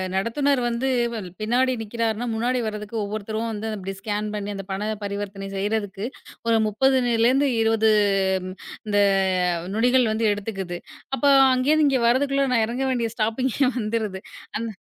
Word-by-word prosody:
நடத்துனர் 255 +7 +1
வந்து 240 +3 -1 0.3
வ 230 - -3 0.2
பின்னாடி 255 +4 +2
நிக்கறாருன்னா, 225 +1 -2
முன்னாடி 245 +3 0
வர்றதுக்கு 210 +1 -6
ஒவ்வொருத்தரும் 215 +2 -3
வந்து 220 0 -4
அத 215 - -3
அப்டி 195 +1 -5
ஸ்கேன் 210 0 -3
பண்ணி 205 0 -4
அந்தப் 195 0 -7
பண 190 +1 -3 0.2
பரிவர்த்தனை 200 -1 -5
செய்றதுக்கு 205 0 -2 0.4
ஒரு 225 -1 +4
30 265 +6 +2
நில 230 -1 +3
இருந்து 275 +2 +3
20 220 -1 +3 1.0
இந்த 205 -1 +1 0.8
நொடிகள் 245 0 +3
வந்து 225 +1 0
எடுத்துக்குது. 195 -4 -4 0.4
அப்போ 285 - +2 0.2
அங்கிருந்து 290 +4 +3
இங்க 265 -2 +2
வர்றதுக்குள்ள 275 +2 +2
நான் 225 - +3
இறங்க 250 +3 -2
வேண்டிய 235 -2 -1
ஸ்டாப்பிங்கே 235 +5 0 0.2
வந்துருது. 215 -3 -2 0.4
அந் 230 +1 -2
225 Hz, 145 wpm, -23 LUFS, 205-250 Hz, 1.0 s, ஒரு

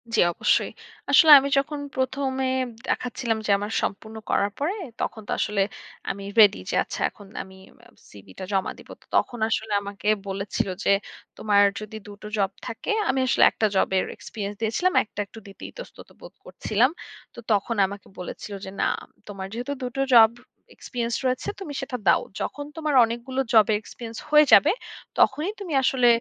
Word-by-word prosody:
জি - - +2
অবশ্যই। - - +1 0.4
আসলে 320 -3 +7
আমি 275 +1 -2
যখন 290 +2 0 0.2
প্রথমে 260 0 -1 0.4
দেখাচ্ছিলাম 235 -2 -1
যে - - +2
আমার 205 +2 -4
সম্পূর্ণ 220 +3 -4
করার 200 +1 +1
পরে 300 +7 0 0.3
তখন 220 - -3
তো - - -5
আসলে 205 -1 0 0.5
আমি 200 +1 -4 0.2
রেডি 205 -2 +7
যে - - -1
আচ্ছা - - -7
এখন 205 -3 -16 0.2
আমি 190 0 -15 0.3
আ - - -16 0.2
সিভি 100 -2 -14
টা - - -5
জমা 190 -1 0
দিব। - - -16
তো - - -23
তখন 240 - +1
আসলে 220 -1 -2
আমাকে 200 0 -7 0.2
বলেছিল 195 +1 -2 0.2
যে - - +1 0.5
তোমার 205 -1 +4 0.2
যদি 215 0 -9
দুটো 205 +1 -10
জব 195 -2 +1
থাকে 225 - -4 0.2
আমি 265 - +1
আসলে - - +3
একটা 220 - 0
জবের 190 0 +2
এক্সপেরিয়েন্স 205 -1 -6
দিয়েছিলাম, 230 +12 +1
একটা 210 - -12
একটু 225 - -13
দিতে 195 - -13
ইতস্তত - - -12
বোধ - - -12
করছিলাম। 230 +5 +1 0.4
তো - - -11
তখন 210 +3 +1
আমাকে 200 +1 -8
বলেছিল 180 +3 -7
যে - - -6
"না - - +3 0.4
তোমার 195 -2 -6
যেহেতু 245 +4 -4
দুটো 250 +2 -3
জব 225 -2 +9 0.5
এক্সপেরিয়েন্স 235 -2 -3
রয়েছে 255 0 -1
তুমি 315 -7 -6
সেটা 265 -2 -4
দাও। - - +5 0.2
যখন 290 - -4
তোমার 310 -2 -2
অনেকগুলো 240 +3 -3
জবে 220 -1 +6
এক্সপেরিয়েন্স 225 +1 -9
হয়ে 300 0 +7
যাবে। 300 - +7 0.5
তখনই 305 +8 +3
তুমি 365 -6 -5
আসলে 255 -1 +3
225 Hz, 170 wpm, -24 LUFS, 205-265 Hz, 0.5 s, জব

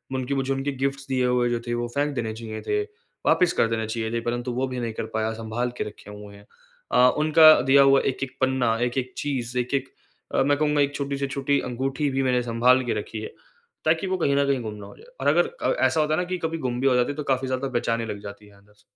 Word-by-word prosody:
उनकी 130 +1 -2
मुझे 135 0 0
उनके 135 +1 -2
गिफ्ट्स 135 0 -2
दिए 130 -1 +1
हुए 125 -1 +2
जो 120 -1 -1
थे 120 - -1
वो 120 0 -2
फेंक 145 +1 0
देने 110 -2 -2
चाहिए 110 -1 -7
थे, 420 0 +1 0.4
वापस 180 - +3
कर - - +2
देने 110 -1 -2
चाहिए 110 0 -3
थे 115 - -1
परंतु 120 +1 -2
वो 130 +2 -1
भी 130 -1 -4
नहीं 115 -2 -3
कर - - -4
पाया, 110 0 0
सँभाल 115 +2 -3
के - - -1
रखे 105 -1 -10
हुए 105 0 -11
हैं। 100 0 -16 0.5
अ, 125 0 +6
उनका 155 +1 +7
दिया 140 +1 +5
हुआ 135 0 +5
एक-एक 135 0 -3
पन्ना, 130 -4 +2
एक-एक 125 +1 -1
चीज़, 125 -4 -3
एक-एक 135 +2 -2 0.6
मैं 145 0 +2
कहूँगा 150 -1 +2
एक 145 0 0
छोटी 140 0 -3
से 140 0 -2
छोटी 140 +1 0
अंगूठी 135 +4 -2
भी 135 0 0
मैंने 125 -1 +2
सँभाल 125 +2 +3
के 120 - 0
रखी 110 +1 -6
है - - -5 0.6
ताकि 160 +4 +2
वो 185 0 0
कहीं 140 -5 +1
न 140 0 +3
कहीं 135 -2 +1
गुम 110 -2 -5
ना 105 -1 -10
हो - - -13
जाए। - - -17
और - - -1
अगर - - +4
अ, - - +2
ऐसा 160 - +1
होता 155 0 +1
है - - -1
ना - - -2
कि 185 - -1
कभी 165 0 -2
गुम 120 0 -3
भी 135 - +3
हो 130 - +4
जाती 125 +2 +2
है 145 - -7
तो 150 - -3
काफ़ी 130 0 -2
ज़्यादा 130 +1 -2
बेचैनी 115 -1 -1
लग 105 -2 -5
जाती 100 0 -10
है 100 - -19
अंदर 100 +1 -24
से। 105 - -29
130 Hz, 265 wpm, -24 LUFS, 115-140 Hz, 0.6 s, उनका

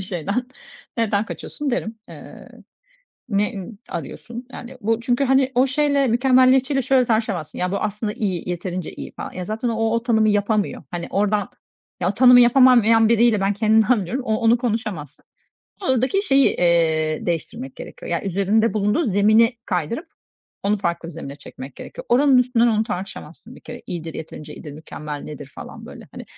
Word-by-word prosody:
şeyden. 195 +7 -3 0.5
Neden 215 -2 +1
kaçıyorsun?" 290 +5 -5
derim. 225 -2 -3
Eee, - - -12 0.8
"Ne, 210 +1 0
ımm, 200 +2 -8
arıyorsun?" 235 - -7
yani 255 +1 -9
Bu 225 +1 0
çünkü, 245 +3 +1
hani, 265 0 +2
o 255 +2 +4
şeyle, 280 0 +1
mükemmeliyetçiyle 260 +2 +3
şöyle 255 0 +3
tartışamazsın 220 -9 -1
"Ya, 180 +1 -1
bu - - 0
aslında 210 0 -3
iyi, 185 -6 -3
yeterince 175 0 -4
iyi." - - -8
falan. - - -6
Ya, 180 - -5
zaten 220 +5 -3
o 225 -1 0
o 230 - 0
tanımı 220 -3 +2
yapamıyor. 205 0 0
Hani, 175 -1 -4
oradan 205 0 0 0.5
ya, 175 - +1
o - - 0
tanımı 250 +2 +7
yapamayan 240 -3 +5
biriyle, 235 -2 +3
ben 195 +1 +1
kendimden 220 +2 +3
biliyorum, 250 +9 -4
o 220 0 0
onu 230 +1 +3
konuşamazsın. 215 - -4 0.6
Oradaki 265 - +1
şeyi, 275 -7 +4
eee, 160 -3 +1
değiştirmek 220 - -4
gerekiyor, - - -9
yani, - - -1
üzerinde 200 +4 +1
bulunduğu 210 +9 +1
zemini 220 - +3
kaydırıp 190 - -2 0.6
onu 205 +1 +1
farklı 170 -4 -3
bir - - -8
zemine 145 -3 -8
çekmek 135 -2 -11
gerekiyor. - - -9
Oranın 265 +2 +5
üstünden 245 -1 +3
onu 220 -2 +2
tartışamazsın 195 +1 -7
bir - - -15
kere. 240 - -10
İyidir, 165 -2 -6
yeterince 155 -1 -8
iyidir, 150 - -9
mükemmel 150 -1 -7
nedir, 145 -2 -8
falan, - - -10
böyle, - - -12
hani. - - -9
220 Hz, 165 wpm, -21 LUFS, 185-245 Hz, 0.8 s, tanımı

